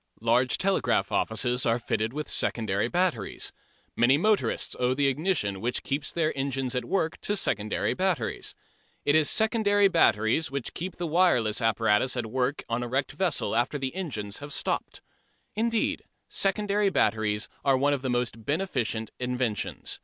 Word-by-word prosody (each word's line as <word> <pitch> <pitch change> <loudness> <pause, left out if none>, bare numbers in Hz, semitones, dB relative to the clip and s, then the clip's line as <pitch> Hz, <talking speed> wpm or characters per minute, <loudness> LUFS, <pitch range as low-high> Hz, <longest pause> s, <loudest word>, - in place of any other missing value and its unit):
Large 120 +3 +2
telegraph 195 +1 +1
offices 125 +3 0
are 115 0 +2
fitted 110 -1 -1
with 150 +3 -4
secondary 110 -2 -1
batteries. 175 - -1 0.4
Many 130 +4 +4
motorists 210 +5 +1
owe 125 +1 +2
the 140 +1 +1
ignition 135 - 0
which 120 +2 -1
keeps 140 +1 -2
their 160 -2 0
engines 135 -2 -2
at 125 - -2
work 170 -4 -1
to 205 - 0
secondary 110 - 0
batteries. 185 -11 -1 0.5
It 145 - +3
is 155 -1 +4
secondary 215 -2 +3
batteries 125 - +3
which 135 -2 -4
keep 180 +3 -5
the 175 - -4
wireless 150 - +3
apparatus 115 +2 +2
at 120 - -1
work 125 +5 -1
on 115 +1 -1
a 120 - -3
wrecked 135 +3 -1
vessel 180 -11 0
after 120 +5 +1
the 135 -2 -3
engines 115 - -4
have 145 0 -6
stopped. - - -2 0.5
Indeed 230 +1 0 0.2
secondary 205 +1 +1
batteries 110 - +1 0.2
are 135 -2 +4
one 145 +2 +2
of 140 - -2
the 130 - -2
most 120 -2 -1
beneficent 125 - -1
inventions. 125 -4 -2
130 Hz, 155 wpm, -27 LUFS, 115-175 Hz, 0.5 s, Many